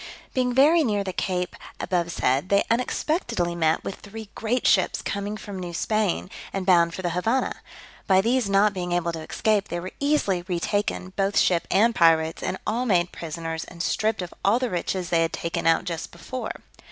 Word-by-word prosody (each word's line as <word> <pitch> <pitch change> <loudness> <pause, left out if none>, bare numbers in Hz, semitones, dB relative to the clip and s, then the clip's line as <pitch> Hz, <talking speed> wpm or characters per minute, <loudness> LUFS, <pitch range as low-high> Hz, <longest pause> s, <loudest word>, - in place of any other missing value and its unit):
Being 250 -1 +1
very 300 +6 +5
near 205 -6 0
the 190 -1 -4
cape 180 -1 -2 0.2
abovesaid, 170 -4 0
they 200 0 +4
unexpectedly 235 - 0
met 160 -2 +1
with 195 - -5
three 215 0 -10
great 235 +3 -1
ships 190 -3 +3
coming 200 +1 -3
from 200 -3 -7
New 175 -2 -5
Spain, 210 -2 0 0.2
and 195 -1 -3
bound 170 -3 +4
for 185 - -6
the 175 - 0
Havannah; 225 +10 0 0.5
by 190 -1 +5
these 230 +1 +1
not 200 +1 +4
being 180 -2 -3
able 175 -1 0
to 165 -1 -6
escape, 205 +5 0
they 175 - -3
were 185 +2 -6
easily 280 -11 +1
retaken, 185 +1 -1
both 195 0 0
ship 175 -2 +3
and 225 +5 +4
pirates, 165 -3 +3
and 190 - -2
all 240 +4 -1
made 175 -4 +2
prisoners, 165 0 -5
and 170 -1 -7
stripped 215 -1 0
of 180 - -8
all 200 +4 +4
the 255 -1 -2
riches 180 0 -2
they 165 -1 +3
had 165 - 0
taken 170 0 -3
but 165 0 +4
just 170 -2 -4
before. 225 +7 -5
190 Hz, 190 wpm, -25 LUFS, 170-215 Hz, 0.5 s, very